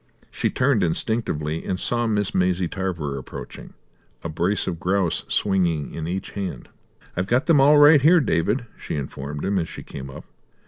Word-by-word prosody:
She -, -, -1 dB
turned 125 Hz, -4 st, +2 dB
instinctively 80 Hz, -4 st, -1 dB
and 95 Hz, -, -2 dB
saw 120 Hz, +2 st, +1 dB
Miss 105 Hz, -1 st, 0 dB
Maisie 90 Hz, -1 st, +1 dB
Tarver 85 Hz, -8 st, -3 dB
approaching, 65 Hz, -, -10 dB, 0.5 s
a 85 Hz, -, -4 dB
brace 85 Hz, +6 st, 0 dB
of 85 Hz, -3 st, -4 dB
grouse 95 Hz, -1 st, 0 dB
swinging 85 Hz, -7 st, 0 dB
in 80 Hz, -1 st, -5 dB
each 95 Hz, +3 st, -4 dB
hand. 95 Hz, -11 st, -5 dB, 0.5 s
"I've 90 Hz, +1 st, -1 dB
got 125 Hz, +7 st, +2 dB
them 155 Hz, -5 st, +5 dB
all, 145 Hz, +2 st, +6 dB
right 145 Hz, 0 st, +7 dB
here, 170 Hz, +5 st, +6 dB
David," 115 Hz, -, 0 dB
she -, -, -6 dB
informed 70 Hz, +1 st, -5 dB
him, 100 Hz, 0 st, +1 dB
as 80 Hz, -, -3 dB
she -, -, -8 dB
came 70 Hz, -1 st, -8 dB
up. 65 Hz, -, -10 dB
95 Hz, 175 wpm, -23 LUFS, 80-115 Hz, 0.5 s, right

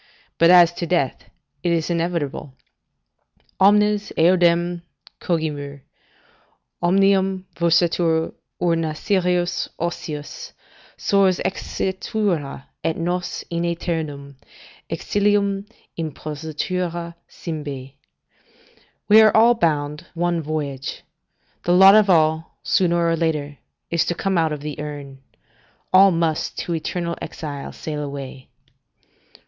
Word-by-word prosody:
But 170 Hz, -, +6 dB
as 175 Hz, -1 st, +7 dB
to 170 Hz, -, -1 dB
death, 160 Hz, -8 st, -1 dB, 0.3 s
it 175 Hz, -, 0 dB
is 165 Hz, 0 st, 0 dB
inevitable: 165 Hz, -5 st, -2 dB, 1.0 s
"Omnes 210 Hz, +1 st, +4 dB
eodem 175 Hz, 0 st, +3 dB, 0.4 s
cogimur; 145 Hz, -4 st, -3 dB, 1.0 s
omnium 190 Hz, +1 st, +2 dB
Versatur 170 Hz, -1 st, +2 dB, 0.3 s
urna 165 Hz, -3 st, 0 dB
serius 180 Hz, -2 st, 0 dB
ocius 155 Hz, -3 st, -5 dB, 0.4 s
Sors 195 Hz, -2 st, +3 dB
exitura, 190 Hz, -7 st, -2 dB, 0.2 s
et 165 Hz, -1 st, -1 dB
nos 175 Hz, +1 st, -2 dB
in 170 Hz, 0 st, -1 dB
aeternum 155 Hz, -5 st, -3 dB, 0.5 s
Exilium 200 Hz, -1 st, 0 dB, 0.3 s
impositura 165 Hz, +3 st, -4 dB, 0.2 s
cymbae." 145 Hz, -5 st, -6 dB, 1.1 s
["We 215 Hz, +1 st, +8 dB
are 215 Hz, 0 st, +5 dB
all 230 Hz, +2 st, +6 dB
bound 150 Hz, -8 st, -1 dB
one 170 Hz, 0 st, 0 dB
voyage; 145 Hz, -3 st, -4 dB, 0.6 s
the 175 Hz, -, +1 dB
lot 190 Hz, +2 st, +8 dB
of 215 Hz, -1 st, +5 dB
all, 160 Hz, -2 st, +2 dB
sooner 170 Hz, -2 st, +2 dB
or 165 Hz, -, +2 dB
later, 150 Hz, -3 st, -2 dB, 0.3 s
is 170 Hz, -1 st, +2 dB
to 175 Hz, -, -1 dB
come 195 Hz, +2 st, -1 dB
out 160 Hz, -1 st, +1 dB
of 150 Hz, -1 st, -4 dB
the 150 Hz, 0 st, -6 dB
urn. 145 Hz, -2 st, -7 dB, 0.7 s
All 195 Hz, +1 st, +8 dB
must 165 Hz, -3 st, -1 dB
to 175 Hz, -, -3 dB
eternal 170 Hz, +1 st, -3 dB
exile 145 Hz, -3 st, -6 dB
sail 150 Hz, -2 st, -5 dB
away." 140 Hz, -2 st, -7 dB
170 Hz, 105 wpm, -22 LUFS, 150-180 Hz, 1.1 s, We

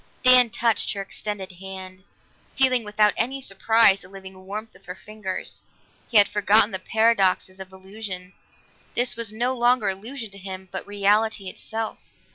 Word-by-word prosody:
Dan 255 Hz, -1 st, +8 dB
touched 230 Hz, 0 st, 0 dB
her 200 Hz, -, -4 dB
extended 195 Hz, -1 st, -6 dB
hand, 190 Hz, 0 st, -10 dB, 0.5 s
feeling 255 Hz, -3 st, +3 dB
without 210 Hz, 0 st, +2 dB
any 265 Hz, +4 st, -1 dB
surprise 220 Hz, -3 st, +3 dB
the 180 Hz, -, -12 dB
living 190 Hz, -1 st, -12 dB
warmth 215 Hz, +3 st, -6 dB
of -, -, -19 dB
her 180 Hz, -, -6 dB
fingers. 210 Hz, -1 st, -6 dB, 0.5 s
He 230 Hz, -, +3 dB
had 205 Hz, -, +7 dB
forgotten 210 Hz, +2 st, +3 dB
the 190 Hz, -, -4 dB
paradoxes 195 Hz, -3 st, +1 dB
of 190 Hz, 0 st, -9 dB
illusion; 190 Hz, -1 st, -8 dB, 0.6 s
this 245 Hz, +1 st, +1 dB
was 230 Hz, -2 st, -2 dB
no 245 Hz, +4 st, -1 dB
longer 240 Hz, -3 st, +2 dB
illusion 220 Hz, +4 st, -5 dB
to 200 Hz, -, -10 dB
him, 190 Hz, -1 st, -8 dB
but 190 Hz, -, -5 dB
reality 205 Hz, 0 st, +1 dB
itself. 225 Hz, 0 st, -6 dB
205 Hz, 155 wpm, -24 LUFS, 190-225 Hz, 0.6 s, Dan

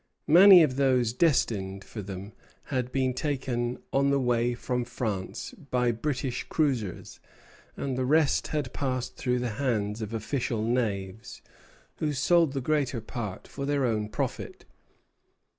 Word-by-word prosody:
Many 185 Hz, 0 st, +10 dB
of 135 Hz, -4 st, 0 dB
those 130 Hz, -4 st, +2 dB
destined 100 Hz, -, +1 dB
for 105 Hz, -, -8 dB
them 100 Hz, +1 st, -8 dB, 0.4 s
had 125 Hz, -1 st, -1 dB
been 130 Hz, -1 st, +1 dB
taken 125 Hz, -3 st, -2 dB, 0.2 s
on 140 Hz, +1 st, +3 dB
the 140 Hz, 0 st, +2 dB
way 120 Hz, -1 st, +1 dB
from 125 Hz, 0 st, -2 dB
France 110 Hz, -5 st, -4 dB, 0.2 s
by 125 Hz, -1 st, +2 dB
British 130 Hz, +1 st, -2 dB
cruisers, 130 Hz, -, -2 dB, 0.6 s
and 135 Hz, -2 st, -2 dB
the 130 Hz, 0 st, -1 dB
rest 155 Hz, +2 st, +3 dB
had 145 Hz, -5 st, -3 dB
passed 130 Hz, -3 st, -2 dB
through 125 Hz, -1 st, 0 dB
the 125 Hz, 0 st, -2 dB
hands 110 Hz, -4 st, -1 dB
of 110 Hz, -1 st, -4 dB
official 115 Hz, 0 st, -2 dB
knaves, 110 Hz, -4 st, -2 dB, 0.5 s
who 150 Hz, -1 st, -1 dB
sold 160 Hz, +2 st, +3 dB
the 135 Hz, -, -2 dB
greater 140 Hz, -3 st, 0 dB
part 110 Hz, -3 st, -6 dB
for 140 Hz, 0 st, -5 dB
their 145 Hz, -2 st, +1 dB
own 105 Hz, -3 st, -1 dB
profit. -, -, -4 dB
125 Hz, 140 wpm, -28 LUFS, 110-140 Hz, 0.6 s, Many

